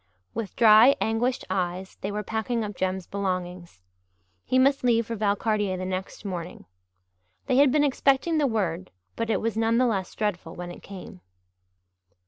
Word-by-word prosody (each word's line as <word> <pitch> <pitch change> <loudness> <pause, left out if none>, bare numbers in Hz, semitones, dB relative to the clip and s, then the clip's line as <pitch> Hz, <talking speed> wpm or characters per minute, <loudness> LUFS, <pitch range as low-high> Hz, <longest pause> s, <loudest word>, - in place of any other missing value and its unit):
With 215 -5 -5
dry, 230 +4 +7
anguished 235 +3 0
eyes 185 0 -3
they 200 - -3
were 210 +1 -3
packing 225 +2 -2
up 210 -1 -5
Jem's 185 0 -2
belongings. 180 - -4 0.6
He 255 - 0
must 275 +1 +3
leave 230 -2 +3
for 230 - -4
Valcartier 205 -2 0
the 185 - -4
next 185 +2 -5
morning. 175 - -6 0.8
They 255 - +1
had 280 -1 +6
been 295 +1 +3
expecting 285 +3 +2
the 290 - +3
word 185 -6 -2 0.3
but 230 0 -3
it - - +1
was 225 0 -1
none 225 +1 +2
the 255 - +4
less 195 -6 -2
dreadful 180 -6 -3
when 175 0 -6
it - - -11
came. 190 -1 -11
210 Hz, 165 wpm, -26 LUFS, 185-235 Hz, 0.8 s, dry